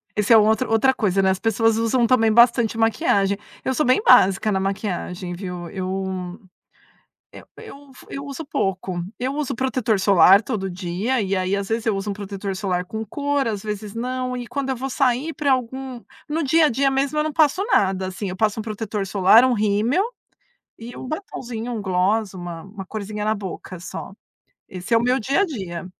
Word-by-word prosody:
Esse 210 +2 +3
é - - +9
outro 220 +4 +3
outra 225 +4 +3
coisa, 195 -5 +1
né, 190 - +3
as 190 0 0
pessoas 225 +1 +2
usam 230 +2 +2
também 225 -2 +3
bastante 235 -1 +4
maquiagem. 215 -4 +2 0.3
Eu 260 - 0
sou 300 - +1
bem 255 +9 +3
básica 195 - +5
na 190 - +1
maquiagem, 190 -2 -3
viu. 180 -2 -6
Eu 185 -1 -4 1.0
eu - - -12
eu 280 0 -12
f - - -16
eu 275 - -6
uso 285 +3 -7
pouco. 190 -9 -2 0.2
Eu 265 +3 -2
uso 300 -3 -2
protetor 250 -5 0
solar 195 0 +6
todo 210 -5 -3
dia, 185 +8 -2
e 195 -1 -1
aí, 185 +1 -1
às 200 -1 -3
vezes 225 +2 -2
eu 220 - +1
uso 200 +1 -3
protetor 195 -1 -5
solar 185 -3 -2
com 220 +3 -5
cor, 285 +4 -1
às 210 -3 -3
vezes 210 -1 -5
não. 255 +2 -3
E 245 -1 -6
quando 275 0 -3
eu 265 - 0
vou 265 +3 -4
sair 265 +4 0
para 290 -3 0
algum 260 0 -2 0.3
no 320 +2 -1
dia 315 +3 +4
a - - 0
dia 270 +3 +2
mesmo 275 +3 0
eu - - +2
não 310 - -3
passo 310 +4 +3
nada, 190 - +1
assim, 190 +1 -5
eu 185 - -6
passo 215 +1 +1
um - - -9
protetor 215 -2 -4
solar, 195 +4 +5
um 255 -1 +3
rímel, 215 - +1 0.8
e 235 +2 -9
um - - -7
batonzinho, 245 - -5
um 220 - -4
gloss, 195 +2 0
uma 175 -3 -7
uma 195 0 -9
corzinha 210 0 -5
na 215 +1 +1
boca, 190 -2 -7
só. 185 +2 -8 0.5
Esse 185 +5 -3
é - - +6
o - - -1
meu 250 +2 +2
dia 275 - +1
a - - +3
dia. 190 - -6
220 Hz, 200 wpm, -22 LUFS, 195-255 Hz, 1.0 s, é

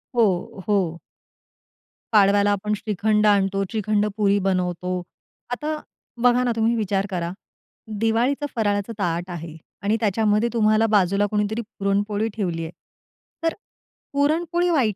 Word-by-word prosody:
हो, 195 -4 +1
हो. 180 -5 +1 1.1
पाडव्याला 205 0 +5
आपण 210 +1 -1
श्रीखंड 210 +1 +1
आणतो, 195 -1 +3
श्रीखंड 215 -1 0
पुरी 200 -1 +3
बनवतो, 180 -1 -1 0.5
आता 300 +5 -2 0.5
बघा 245 0 +5
ना, 245 - +1
तुम्ही 225 +1 +2
विचार 200 -3 0
करा, 175 -3 -2 0.7
दिवाळीचा 235 +6 +1
फराळाचं 205 0 0
ताट 175 0 -1
आहे 165 -2 -7 0.3
आणि 210 +3 +1
त्याच्यामध्ये 215 +2 +2
तुम्हाला 215 0 +3
बाजूला 200 -1 +3
कुणीतरी 210 +2 0 0.2
पुरणपोळी 205 +2 0
ठेवली 175 -6 -2
आहे. 160 - -6 0.7
तर 330 - +2 0.6
पुरणपोळी 335 +5 +1
वाईट 255 - +2
205 Hz, 120 wpm, -23 LUFS, 195-225 Hz, 1.1 s, पाडव्याला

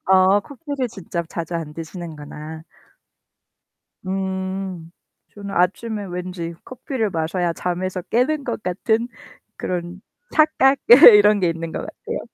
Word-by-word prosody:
어 190 +1 +5
커피를 280 +1 -5
직접 170 -5 -5
자주 170 0 -5
안 155 -2 -4
드시는구나. 160 -2 -8 1.4
음. 190 -2 -4 0.4
저는 200 -1 -8
아침에 205 +4 0
왠지 180 -2 -5
커피를 255 -3 -3
마셔야 170 +1 -1
잠에서 180 +2 -3
깨는 270 +7 0
것 235 -3 -4
같은 220 +6 0 0.5
그런 175 +1 -4 0.3
착각 290 -3 +4 0.4
이런 210 0 +6
게 180 - +2
있는 165 0 -4
것 - - -4
같아요. - - -6
185 Hz, 240 characters per minute, -21 LUFS, 170-215 Hz, 1.4 s, 이런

